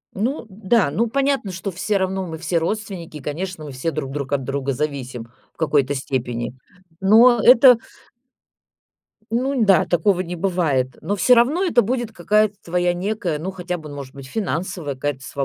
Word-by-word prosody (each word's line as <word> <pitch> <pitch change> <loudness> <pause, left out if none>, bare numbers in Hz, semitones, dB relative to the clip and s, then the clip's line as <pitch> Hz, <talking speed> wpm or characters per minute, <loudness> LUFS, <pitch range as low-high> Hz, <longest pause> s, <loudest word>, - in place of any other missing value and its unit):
Ну 235 +4 -2
да. 200 -2 +1
Ну, 230 +9 0
понятно, 275 -5 0
что 185 +2 -4
все 190 +3 -1
равно 190 0 -2
мы 160 -2 -6
все 170 +1 0
родственники, 170 -3 -4
конечно, 160 +4 -5
мы 145 - -7
все 130 +6 -2
друг 140 -3 -4
друг 140 -1 -5
от 135 -2 0
друга 135 +1 -2
зависим 130 -4 -4 0.3
в - - -42
какой-то 145 -3 +1
степени, 125 -3 -3 0.5
но 230 +5 +6
это 250 0 +8 1.5
Ну 255 +2 0
да, 195 -5 +5
такого 180 +2 +1
не 180 -1 -4
бывает. 160 -9 0
Но 195 +6 -1
все 250 +5 +5
равно 270 +10 +3
это 295 -10 +3
будет 240 +1 -2
какая-то 210 +4 +2
твоя 175 +1 0
некая, 185 -3 -2
ну, 175 +5 -4
хотя 180 -1 -4
бы, 155 -3 -10
ну, 145 - -8
может 135 -2 -8
быть, 135 -1 -10
финансовая 175 -3 -3
какая-то 135 0 -3
сва 140 +1 -3
180 Hz, 175 wpm, -21 LUFS, 145-215 Hz, 1.5 s, это